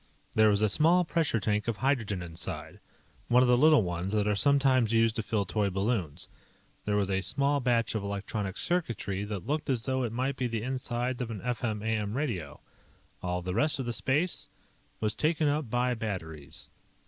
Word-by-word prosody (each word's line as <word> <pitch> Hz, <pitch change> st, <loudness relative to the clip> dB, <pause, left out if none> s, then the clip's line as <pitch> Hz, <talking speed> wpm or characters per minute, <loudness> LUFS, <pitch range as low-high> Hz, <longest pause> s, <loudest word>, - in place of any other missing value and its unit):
There 110 Hz, 0 st, +5 dB
was 105 Hz, 0 st, +2 dB
a -, -, +5 dB
small 165 Hz, -, +4 dB
pressure 160 Hz, -8 st, +1 dB
tank 105 Hz, +1 st, -1 dB
of 115 Hz, -3 st, -1 dB
hydrogen 115 Hz, -8 st, 0 dB
inside 80 Hz, -1 st, -6 dB, 0.5 s
one 125 Hz, +1 st, +5 dB
of -, -, +3 dB
the 125 Hz, -, +6 dB
little 150 Hz, 0 st, +5 dB
ones 90 Hz, +1 st, -3 dB
that 105 Hz, -1 st, +1 dB
are 105 Hz, -, +2 dB
sometimes 135 Hz, -2 st, +4 dB
used 115 Hz, -1 st, +3 dB
to -, -, +1 dB
fill 105 Hz, -1 st, -1 dB
toy 105 Hz, +1 st, 0 dB
balloons. 95 Hz, -5 st, -1 dB, 0.6 s
There 105 Hz, -, 0 dB
was 100 Hz, -1 st, +1 dB
a 95 Hz, 0 st, +1 dB
small 140 Hz, +6 st, +1 dB
batch 120 Hz, -3 st, +1 dB
of 110 Hz, -, -1 dB
electronic 100 Hz, 0 st, -4 dB
circuitry 115 Hz, -, 0 dB
that 105 Hz, -4 st, -5 dB
looked 150 Hz, +1 st, -2 dB
as 125 Hz, -4 st, +1 dB
though 130 Hz, -1 st, -1 dB
it 120 Hz, -3 st, -1 dB
might 130 Hz, +3 st, -2 dB
be 125 Hz, -, 0 dB
the 115 Hz, -2 st, -3 dB
insides 125 Hz, -1 st, -2 dB
of 120 Hz, -, -3 dB
an 110 Hz, -3 st, -5 dB
FM 115 Hz, -3 st, -2 dB
AM 110 Hz, 0 st, -1 dB
radio. 90 Hz, -, -3 dB, 0.6 s
All 90 Hz, -1 st, -2 dB
of 90 Hz, -, -6 dB
the 90 Hz, -, -2 dB
rest 150 Hz, +9 st, +2 dB
of 135 Hz, -, -3 dB
the 120 Hz, -, -2 dB
space 150 Hz, +9 st, 0 dB, 0.5 s
was 110 Hz, -1 st, +1 dB
taken 155 Hz, +2 st, +1 dB
up 145 Hz, -3 st, 0 dB
by 125 Hz, +2 st, +1 dB
batteries. 80 Hz, -, -5 dB
115 Hz, 195 wpm, -29 LUFS, 100-130 Hz, 0.6 s, the